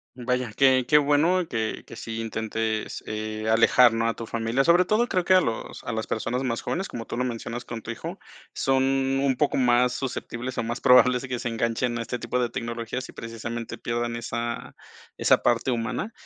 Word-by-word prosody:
Vaya, 125 Hz, -1 st, -1 dB
qué 130 Hz, -2 st, +5 dB
qué 150 Hz, -, +6 dB
bueno 160 Hz, +5 st, +3 dB
que 110 Hz, -2 st, -3 dB
que -, -, -11 dB
sí 115 Hz, -1 st, -6 dB
intentes, 110 Hz, -1 st, -3 dB
eh, 110 Hz, 0 st, -4 dB
alejar, 115 Hz, +2 st, +5 dB
¿no?, 115 Hz, 0 st, +1 dB
a -, -, -2 dB
tu 115 Hz, -, -6 dB
familia. 115 Hz, +4 st, 0 dB
Sobre 170 Hz, +4 st, +5 dB
todo, 215 Hz, +6 st, +2 dB
creo 185 Hz, -5 st, 0 dB
que 185 Hz, +1 st, +4 dB
a -, -, +8 dB
los 115 Hz, -10 st, -4 dB
a -, -, -4 dB
las 110 Hz, -1 st, -3 dB
personas 120 Hz, +3 st, -2 dB
más 115 Hz, -3 st, -2 dB
jóvenes, 190 Hz, +2 st, -2 dB
como 115 Hz, -1 st, -6 dB
tú -, -, -5 dB
lo 125 Hz, -, 0 dB
mencionas 120 Hz, 0 st, -4 dB
con 115 Hz, -2 st, -7 dB
tu 115 Hz, -, -5 dB
hijo, 115 Hz, -, -6 dB, 0.4 s
son 135 Hz, 0 st, +1 dB, 0.4 s
un 135 Hz, -2 st, +2 dB
poco 150 Hz, -2 st, +1 dB
más 125 Hz, -1 st, +3 dB
susceptibles. 130 Hz, -1 st, -4 dB
o -, -, 0 dB
más 120 Hz, +2 st, -4 dB
probables, 125 Hz, 0 st, +6 dB
que 125 Hz, -1 st, -2 dB
se 120 Hz, -, -4 dB
enganchen 115 Hz, +1 st, -1 dB
a -, -, -1 dB
este 115 Hz, +2 st, -3 dB
tipo 120 Hz, +1 st, -2 dB
de 120 Hz, -1 st, 0 dB
tecnologías, 115 Hz, +2 st, -4 dB
y -, -, -13 dB
precisamente 115 Hz, 0 st, -6 dB
pierdan 120 Hz, 0 st, -2 dB
esa 115 Hz, 0 st, -4 dB, 0.4 s
esa -, -, +3 dB
parte 120 Hz, +2 st, +2 dB
humana. 120 Hz, -, -2 dB
120 Hz, 205 wpm, -25 LUFS, 115-130 Hz, 0.4 s, a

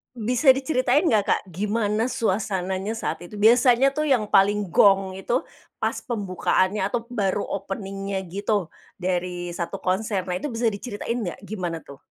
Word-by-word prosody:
Bisa 245 Hz, +4 st, +4 dB
diceritain 265 Hz, +2 st, +1 dB
nggak 215 Hz, -6 st, +3 dB
Kak, -, -, +2 dB
gimana 210 Hz, +4 st, 0 dB
suasananya 195 Hz, -3 st, -1 dB
saat 225 Hz, -5 st, -4 dB
itu? 175 Hz, -, -13 dB
Biasanya 245 Hz, +4 st, +5 dB
tuh 305 Hz, -, +1 dB
yang 245 Hz, -8 st, +2 dB
paling 205 Hz, +1 st, +3 dB
gong 195 Hz, +1 st, +4 dB
itu, 235 Hz, +7 st, 0 dB, 0.4 s
pas -, -, 0 dB
pembukaannya 195 Hz, -3 st, 0 dB
atau 230 Hz, +3 st, -2 dB
baru 205 Hz, -5 st, 0 dB
opening-nya 195 Hz, 0 st, -4 dB
gitu 200 Hz, -1 st, -1 dB, 0.3 s
dari 180 Hz, -1 st, -2 dB
satu 175 Hz, +3 st, -4 dB
konser. 190 Hz, +2 st, 0 dB
Nah 180 Hz, -, -1 dB
itu 285 Hz, +8 st, -4 dB
bisa 230 Hz, 0 st, +1 dB
diceritain 220 Hz, +2 st, -4 dB
nggak 200 Hz, -8 st, -4 dB
gimana 175 Hz, -6 st, -3 dB
tuh? 140 Hz, -3 st, -14 dB
205 Hz, 150 wpm, -24 LUFS, 190-235 Hz, 0.4 s, Biasanya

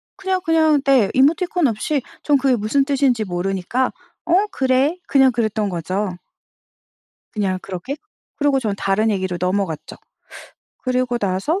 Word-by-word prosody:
그냥, 380 Hz, -1 st, -1 dB
그냥 315 Hz, -3 st, +3 dB
네. 265 Hz, -7 st, +4 dB
이모티콘 320 Hz, +4 st, +3 dB
없이 250 Hz, +6 st, -1 dB, 0.2 s
전 290 Hz, -2 st, +3 dB
그게 265 Hz, -1 st, +2 dB
무슨 235 Hz, +6 st, +1 dB
뜻인지 270 Hz, -5 st, +1 dB
모르니까 195 Hz, +7 st, -1 dB, 0.3 s
"어 360 Hz, +5 st, +3 dB
그래." 265 Hz, +5 st, +2 dB
그냥 265 Hz, -2 st, +5 dB
그랬던 220 Hz, -3 st, -1 dB
거죠. 185 Hz, +2 st, -3 dB, 1.2 s
그냥 190 Hz, -3 st, -1 dB
그렇게. 195 Hz, +9 st, -5 dB, 0.4 s
그러고 285 Hz, -2 st, +2 dB
전 210 Hz, -5 st, -2 dB
다른 210 Hz, +3 st, +1 dB
얘기로 190 Hz, -3 st, -1 dB
넘어갔죠. 180 Hz, -3 st, -2 dB, 0.8 s
그러고 255 Hz, -1 st, -1 dB
나서 200 Hz, -, -1 dB
250 Hz, 290 characters per minute, -20 LUFS, 195-280 Hz, 1.2 s, 그냥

